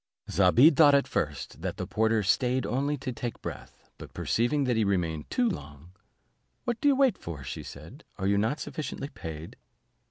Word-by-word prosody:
Zobeide 115 - +6
thought 145 -1 +7
at 140 - +2
first, 75 -3 -3
that - - -3
the - - -3
porter 110 0 +1
staid 125 +6 +1
only 140 +7 -1
to 135 -1 -4
take 120 -1 -5
breath, - - -9
but - - -11
perceiving 140 +6 +1
that 125 -2 +1
he 110 - +2
remained 85 -6 -1
too 250 -1 +1
long, 80 - -6 0.7
"What 240 -2 -2
do - - +3
you 280 - +5
wait 265 -6 +3
for," 80 -5 -7
said 65 - -9
she, - - -30
"are 95 - -2
you 100 0 +3
not 115 +9 0
sufficiently 145 -2 -5
paid?" 80 - -8
115 Hz, 185 wpm, -28 LUFS, 90-145 Hz, 0.7 s, thought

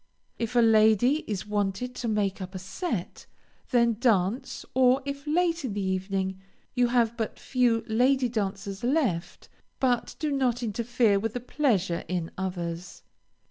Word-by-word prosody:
If 230 +1 -3
a 240 - +6
lady 220 +4 +5
is 205 -2 -3
wanted 210 +4 -2
to 240 - -3
make 205 -3 0
up 185 +1 -7
a - - -2
set, 195 - -4 0.4
then 235 -3 +3
dance, 235 +1 +1
or 260 +1 +4
if, 280 +1 -5
late 335 +1 +1
in 245 -6 -3
the 205 - -2
evening, 190 0 -2 0.3
you 245 -1 +3
have 235 -1 +2
but 225 -2 -3
few 245 -3 +1
lady 250 +3 +3
dancers 200 -3 -3
left, 245 - -1 0.3
but 250 -3 0
do 305 -2 -2
not 250 -3 0
interfere 230 -1 +1
with 225 +1 -2
the - - -1
pleasure 225 - 0
in 175 -2 -2
others. 180 -1 -5
225 Hz, 150 wpm, -27 LUFS, 195-250 Hz, 0.4 s, a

